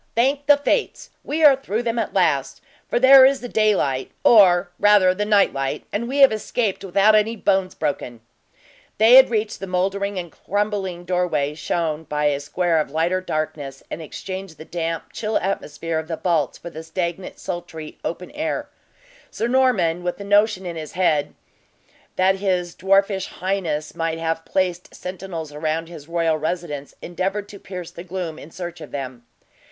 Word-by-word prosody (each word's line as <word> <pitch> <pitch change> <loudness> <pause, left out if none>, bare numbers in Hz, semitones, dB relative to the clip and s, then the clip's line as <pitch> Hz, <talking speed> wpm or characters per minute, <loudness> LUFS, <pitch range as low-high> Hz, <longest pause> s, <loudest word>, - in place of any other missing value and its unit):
Thank 275 +5 +1
the 290 -1 +7
fates, - - -1
we 315 +2 -2
are 290 -3 +8
through 240 -4 -3
them, 235 0 -1
at - - -2
last! 155 -8 +1 0.3
for - - 0
there 265 +1 +9
is 270 +1 +5
the 245 - -5
daylight, 195 - +1
or, 180 -5 +6
rather 205 -3 +5
the 205 +3 -2
nightlight, 195 -10 +1
and 235 +3 -1
we 270 +3 -3
have 270 - +8
escaped 215 -1 -2
without 200 +3 +4
any 215 +2 +3
bones 195 -3 0
broken." 130 -6 -3 0.8
They 220 +3 +6
had 265 +1 +9
reached 220 -2 -1
the 195 - -6
mouldering 195 +2 -1
and 175 -2 -5
crumbling 200 -3 -3
doorway, 170 -5 0
shown 160 0 -2
by 150 0 -2
a 145 -1 +2
square 165 +3 0
of 150 - -1
lighter 170 +5 0
darkness, 150 -5 -4
and 165 - -5
exchanged 185 +2 -7
the 155 - -10
damp, 165 -1 -4
chill 215 -1 -1
atmosphere 165 -4 -3
of 160 - -7
the 165 -1 -4
vaults 165 -7 0
for 170 - -9
the 160 - -7
stagnant, 170 +3 -4
sultry 170 -3 -7
open 180 +2 -5
air. 310 +2 -3 0.6
Sir 230 - -2
Norman, 240 -10 +2
with 180 +2 -3
a - - -6
notion 205 -1 +2
in 170 -2 -5
his 155 -2 -7
head 160 -5 +1 0.8
that 190 +1 +3
his 180 -3 -1
dwarfish 195 +1 +1
highness 175 -6 -3
might 165 0 -2
have 165 0 -2
placed 180 -1 -2
sentinels 180 -4 -6
around 160 +2 -2
his 155 -4 -11
royal 165 -2 +1
residence, 155 -3 -4
endeavored 195 +3 -3
to 200 - -11
pierce 180 -3 -8
the 170 0 -9
gloom 175 -3 -5
in 150 - -11
search 175 0 -7
of - - -9
them. 130 -4 -7
180 Hz, 170 wpm, -22 LUFS, 160-205 Hz, 0.8 s, there